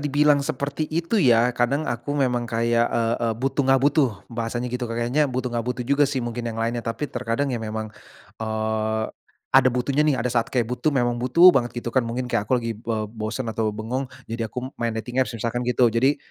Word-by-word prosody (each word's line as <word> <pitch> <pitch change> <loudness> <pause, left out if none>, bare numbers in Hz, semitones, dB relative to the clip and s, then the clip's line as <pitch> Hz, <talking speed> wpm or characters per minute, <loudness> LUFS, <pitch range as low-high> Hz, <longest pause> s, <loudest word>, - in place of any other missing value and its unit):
dibilang 145 0 +3
seperti 145 +1 -3
itu 170 +7 0
ya. 120 -4 +4
Kadang 130 +6 0
aku 120 +5 -3
memang 125 -3 0
kayak, 115 0 +2
eee 115 0 +1
eee, 115 -1 +1
butuh 135 +3 -1
enggak 135 -1 +5
butuh, 145 -1 +4 0.2
bahasanya 120 +1 -3
gitu. 125 -1 -2
Kayaknya 120 +6 +1
butuh 125 -1 -3
enggak 120 0 -2
butuh 125 -1 -2
juga 140 +2 +3
sih 130 -4 -2
mungkin 120 0 -4
yang 115 - -5
lainnya. 115 +1 -1
Tapi 115 +6 -3
terkadang 125 +1 -2
ya 120 - -2
memang, 110 0 -4 0.5
eee, 110 0 -1 0.5
ada 135 -1 +6
butuhnya 130 +3 0
nih. 140 - +3
Ada 125 0 -1
saat - - -6
kayak 125 -3 +1
butuh, 125 +6 -1
memang 120 -4 +1
butuh 170 +9 +7
banget, 120 -4 0
gitu 120 - -3
kan. 130 - +4
Mungkin 125 +1 -4
kayak 105 0 0
aku 130 - +3
lagi 115 - -1
be 110 -2 -2
bosen 110 +2 -4
atau 110 0 0
bengong, 125 +5 -3 0.2
jadi 115 0 -4
aku 125 +5 -6
main 115 -1 -1
dating 125 +3 -2
apps, 125 -2 -1
misalkan 120 +2 -2
gitu. 125 0 +3
Jadi 130 +5 +3
120 Hz, 210 wpm, -24 LUFS, 115-135 Hz, 0.5 s, butuh